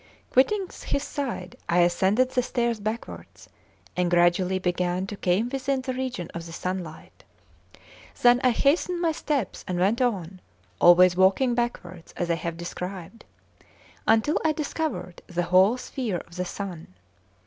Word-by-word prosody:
Quitting 385 +10 +3 0.2
his 280 - 0
side, 245 -13 -4
I 175 +1 +4
ascended 195 +9 +2
the 255 - +2
stairs 235 -2 -1
backwards, 215 +3 -6 0.5
and 180 -1 +1
gradually 175 +2 +3
began 180 0 -1
to 205 - -6
come 195 +5 0
within 270 0 -1
the 260 0 -3
region 255 -9 -4
of 170 0 -6
the - - -9
sunlight. 180 -2 -6 1.0
Then 245 +1 +5
I 255 - +5
hastened 305 +8 +1
my 335 -2 +2
steps, 290 -8 -2
and 180 - -2
went 200 +7 +2
on, 190 -7 -1 0.4
always 175 +1 +7
walking 190 +7 +3
backwards 185 -8 -4
as 175 -1 -1
I - - +2
have 170 -1 -4
described, 180 +4 -7 0.8
until 225 +8 +3
I 315 - +2
discovered 290 - -4
the 175 -1 -2
whole 185 +7 +4
sphere 245 -6 -3
of 170 - -16
the 180 0 -2
sun. 175 - -7
195 Hz, 150 wpm, -25 LUFS, 175-255 Hz, 1.0 s, always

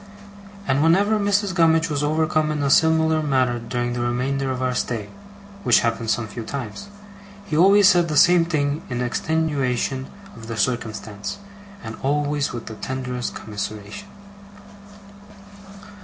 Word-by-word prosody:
And 135 +1 +2
whenever 200 +7 +3
Mrs. 205 -1 +1
Gummidge 165 -1 +3
was 145 -3 -2
overcome 155 +1 +1
in 150 -1 -2
a 140 - +1
similar 160 0 +3
manner 130 -5 +1
during 120 +1 -3
the 120 - -3
remainder 130 +3 -1
of 130 -1 -2
our 130 0 0
stay 115 -4 -3 0.5
(which - - +4
happened 115 -1 -1
some 115 0 0
few 110 +3 -7
times), 135 - -6 0.6
he 160 - -3
always 195 +4 +6
said 175 -3 +4
the 155 -2 -1
same 175 +2 +6
thing 150 -3 -1
in 120 -1 -3
extenuation 135 -2 -1 0.3
of 115 -1 -11
the 115 -1 -5
circumstance, 110 - -3 0.5
and 110 0 -7
always 145 +1 0
with 120 -2 -6
the 110 - -7
tenderest 125 +1 -4
commiseration. 105 - -6
140 Hz, 140 wpm, -22 LUFS, 120-160 Hz, 0.6 s, always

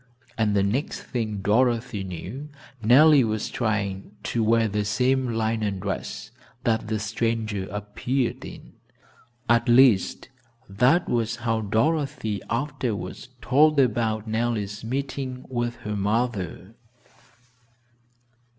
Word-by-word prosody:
and 110 -3 +1
the 100 - +3
next 115 +9 -2
thing 110 -5 -3
Dorothy 115 -1 +1
knew, 105 - -7 0.3
Nellie 135 +5 +6
was 110 -2 -2
trying 105 -3 -2
to 115 - -1
"wear 115 +1 +3
the 105 0 -1
same 130 +5 +1
linen 110 -3 0
dress" 95 0 -5 0.3
that 110 -2 0
the 110 0 -1
stranger 110 -2 -2
appeared 105 +6 -2
in - - -11 0.7
at 120 +1 +3
least, 120 -5 +4 0.4
that 125 - +3
was 115 -1 0
how 115 -1 +1
Dorothy 125 - 0
afterwards 120 -6 -3
told 150 +3 +4
about 110 -3 +1
Nellie's 110 -2 -2
meeting 130 +1 -4
with 120 -1 -2
her 105 0 -4
mother. 105 -2 -2
115 Hz, 110 wpm, -25 LUFS, 105-125 Hz, 0.7 s, Nellie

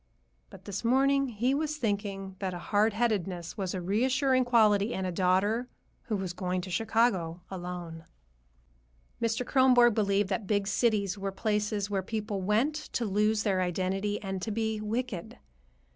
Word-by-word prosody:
But - - -14
this 200 +1 -5
morning 275 +3 +3
he 240 +4 0
was 305 +1 -1
thinking 200 -5 -3
that 185 -2 -3
hard 205 +4 +1
headedness 195 -7 -1
was 190 -3 -3
a 185 - -3
reassuring 255 +7 +2
quality 215 -3 +3
in 190 - -2
a 185 - -1
daughter 190 +7 +1 0.4
who 220 - -1
was 190 -3 -3
going 180 0 -2
to 185 +1 -7
Chicago 190 -5 +1
alone. 175 -3 -6 1.2
Mr. 230 +2 0
Kronborg 250 -3 +5
believed 200 -2 +1
that 200 0 -2
big 205 -2 +1
cities 200 -1 +1
were 195 0 -2
places 210 0 -1
where 195 -1 0
people 210 0 -3
went 215 +10 +2
to 300 -5 -4
lose 210 +1 +1
their 190 -3 +1
identity 190 +3 -1
and 190 -1 -4
to 220 - -3
be 220 0 -1
wicked. 220 -3 -4
205 Hz, 155 wpm, -29 LUFS, 190-230 Hz, 1.2 s, Kronborg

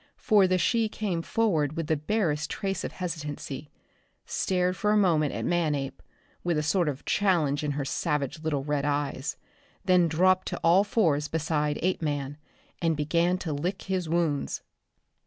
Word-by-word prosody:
For 205 -4 +4
the 185 0 +2
she 225 +4 +2
came 195 -6 -2
forward 165 -8 0
with 165 - -1
the 160 +1 +1
barest 155 -2 -1
trace 195 -1 -3
of - - -4
hesitancy, 150 -5 -5 0.6
stared 180 -1 0
for 210 - 0
a 210 - +4
moment 160 -7 +3
at - - -3
Manape, 150 -6 -1 0.4
with 175 -2 +1
a 150 - 0
sort 165 +1 +2
of 140 -1 -6
challenge 160 -8 +2
in 145 -1 -1
her 140 -1 -2
savage 150 0 -1
little 155 -3 -1
red 145 -1 -1
eyes, 145 0 -2 0.5
then 180 -2 +5
dropped 185 +3 +3
to - - -3
all 175 +4 +5
fours 165 -9 +1
beside 150 -2 -1
Apeman 145 -6 -1 0.4
and 165 -2 +1
began 170 +4 +1
to 165 -4 -4
lick 175 +7 -3
his 185 -4 -2
wounds! 160 -4 0
160 Hz, 160 wpm, -27 LUFS, 150-185 Hz, 0.6 s, then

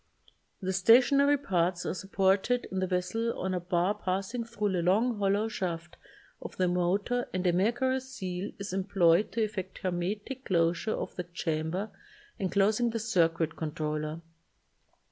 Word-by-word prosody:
The 190 +1 -1
stationary 260 +9 +5
parts 180 -9 0
are - - -1
supported 195 +6 +1
in 190 - -1
the 185 - 0
vessel 185 +6 -1
on 190 0 -1
a 180 - 0
bar 175 +2 +1
passing 195 +4 -2
thru 210 -3 -2
the 180 -2 0
long 210 +6 +2
hollow 200 +2 +2
shaft 175 -5 -4 0.5
of - - -8
the 185 - +2
motor 195 +7 0
and 185 0 -1
a 175 - +3
mercury 240 +8 +1
seal 195 -8 -5
is 200 -1 -6
employed 190 -1 +3
to 225 - +1
effect 195 -3 -4
hermetic 200 +9 -3
closure 170 +3 +1
of - - -5
the 180 - -2
chamber 170 +3 -3 0.5
enclosing 205 +5 +2
the 230 - -2
circuit 165 -7 +1
con 155 -2 -4
troller. 155 +1 -3
190 Hz, 150 wpm, -29 LUFS, 175-220 Hz, 0.5 s, stationary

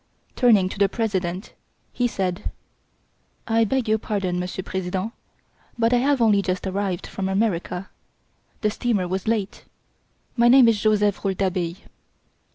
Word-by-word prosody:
Turning 220 -7 +4
to 190 - -7
the 200 -1 +4
President, 190 -4 -2 0.4
he 245 - +1
said: 190 -5 -2 1.0
"I 225 0 +3
beg 255 +1 0
your 220 0 +2
pardon, 195 -5 -2
Monsieur 180 +1 -4
President, 190 +4 -3 0.6
but 230 +1 +2
I - - +5
have 275 +2 +2
only 210 -3 +4
just 185 -1 -2
arrived 190 -2 -2
from 190 -1 -4
America. 190 -2 -1 0.7
The 215 - +1
steamer 210 -5 0
was 190 +2 -3
late. 215 -3 -2 0.7
My 235 -1 +4
name 250 0 +7
is 220 -3 +2
Joseph 210 -2 +2
Rouletabille!" 185 -3 -1
200 Hz, 140 wpm, -23 LUFS, 185-225 Hz, 1.0 s, name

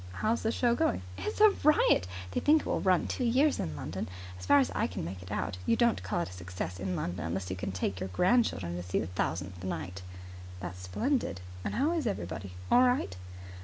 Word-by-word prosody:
"How's 220 - 0
the 225 - +1
show 240 0 +2
going?" 280 - +1
"It's 95 +1 -4
a 430 -1 +9
riot. 300 - +4 0.2
They - - 0
think 305 +1 +5
it - - -11
will - - 0
run 185 -2 +3
two 255 - -2
years 265 +5 +3
in 80 - -3
London. 80 +6 -4 0.3
As 90 - -8
far 145 - +7
as 135 -3 +3
I - - +1
can - - -5
make 90 +2 -6
it 95 - -10
out 90 -4 -2
you - - +4
don't 235 - +2
call 95 -1 -1
it 85 - -3
a - - -10
success 90 0 -5
in 95 -1 -2
London 90 -1 -3
unless 90 +2 -3
you - - -1
can 95 +1 -4
take 95 +1 -2
your 95 - -3
grandchildren 100 - +2
to - - -4
see 90 +1 -2
the - - 0
thousandth 90 +1 -3
night." 90 +1 -4 0.6
"That's 90 0 -6
splendid. 100 - -1 0.2
And - - -3
how 285 +7 +2
is 325 -7 0
everybody? 95 - -4 0.2
All 245 - +7
right?" 250 - +2
95 Hz, 225 wpm, -30 LUFS, -, 0.6 s, a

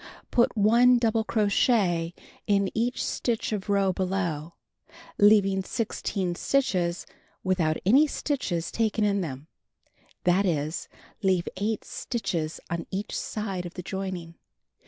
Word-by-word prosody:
Put 240 -1 +2
1 235 +4 +6
double 225 -1 +1
crochet 200 -6 +2 0.3
in 200 -1 +2
each 235 +2 0
stitch 230 -2 -1
of 210 -1 -3
row 195 -2 +2
below, 175 -4 -2 0.6
leaving 200 -2 +5
16 195 -3 -2
stitches 180 -7 0 0.4
without 175 -4 +1
any 270 +10 +6
stitches 235 - -2
taken 220 -1 0
in 200 -1 +2
them; 140 -4 -5 0.8
that 185 +3 +3
is, 155 -1 -2 0.3
leave 185 -3 +2
8 210 +3 -2
stitches 165 -9 -3
on 170 -1 -4
each 200 +3 -4
side 195 -5 -3
of 175 - -12
the 180 - -6
joining. 185 -3 -5
195 Hz, 120 wpm, -27 LUFS, 175-220 Hz, 0.8 s, 1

